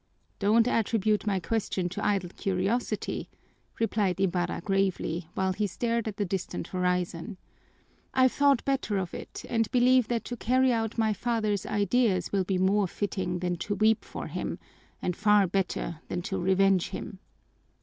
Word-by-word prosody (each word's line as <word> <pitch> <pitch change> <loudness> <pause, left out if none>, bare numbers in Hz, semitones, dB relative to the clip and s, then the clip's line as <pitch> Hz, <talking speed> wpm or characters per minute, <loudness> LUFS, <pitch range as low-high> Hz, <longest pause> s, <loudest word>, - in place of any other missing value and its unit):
"Don't 220 +3 +4
attribute 215 -3 +1
my 195 -2 +1
question 190 -2 -1
to - - -5
idle 195 -4 0
curiosity," 195 +5 -1 0.5
replied 205 -5 +1
Ibarra 180 -2 0
gravely, 185 -3 0
while 190 0 +1
he 205 +2 0
stared 230 +4 -1
at 205 -2 -4
the 205 - 0
distant 185 0 -4
horizon. 180 +1 -1 0.7
"I've 260 -1 +4
thought 280 -3 +3
better 270 -7 0
of 185 -3 -3
it - - -8
and 225 -2 0
believe 250 -1 +4
that 235 -2 -1
to 245 - -4
carry 255 +2 +3
out 225 0 -2
my 220 -1 +2
father's 215 -2 -1
ideas 205 -1 +1
will 195 -2 +1
be 190 0 0
more 195 +2 +3
fitting 185 -2 -2
than 180 -1 -1
to 205 +4 -2
weep 215 +2 +3
for - - -7
him, - - -4 0.5
and 180 - -1
far 210 0 +4
better 180 -3 -2
than 175 - -3
to 190 0 -3
revenge 190 0 +3
him. 200 -3 -7
200 Hz, 160 wpm, -28 LUFS, 185-225 Hz, 0.7 s, Don't